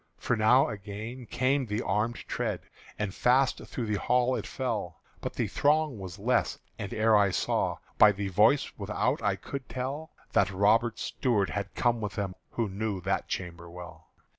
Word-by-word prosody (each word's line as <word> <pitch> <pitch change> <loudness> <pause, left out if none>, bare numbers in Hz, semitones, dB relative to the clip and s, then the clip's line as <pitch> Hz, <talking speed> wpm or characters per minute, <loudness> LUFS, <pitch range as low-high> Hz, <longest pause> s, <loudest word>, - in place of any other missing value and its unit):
For - - 0
now 110 +5 +5
again 110 +4 -7
came 130 +1 +1
the 105 +2 -1
armèd 110 +3 -1
tread, - - -2 0.4
And 105 -3 -2
fast 130 +4 +3
through 120 - -4
the 105 -2 -1
hall 125 +1 +2
it 110 - -4
fell; 110 - -3 0.2
But - - -4
the - - 0
throng 150 -4 +2
was 95 -2 -7
less: - - +1 0.2
and 100 - -4
ere 110 0 +3
I 100 -1 +5
saw, 90 - 0 0.2
By 105 - +9
the 100 0 -3
voice 105 +9 +3
without - - 0
I - - +1
could 140 -2 -7
tell 135 +5 -4 0.2
That 100 -2 +3
Robert 105 +4 +3
Stuart 110 -7 0
had 100 -1 -4
come 120 -2 +1
with 105 -1 -4
them 100 -3 -2 0.2
Who 115 -2 0
knew 100 0 -3
that 95 +2 -1
chamber 85 -2 -5
well. 90 0 -11
110 Hz, 175 wpm, -29 LUFS, 100-125 Hz, 0.4 s, By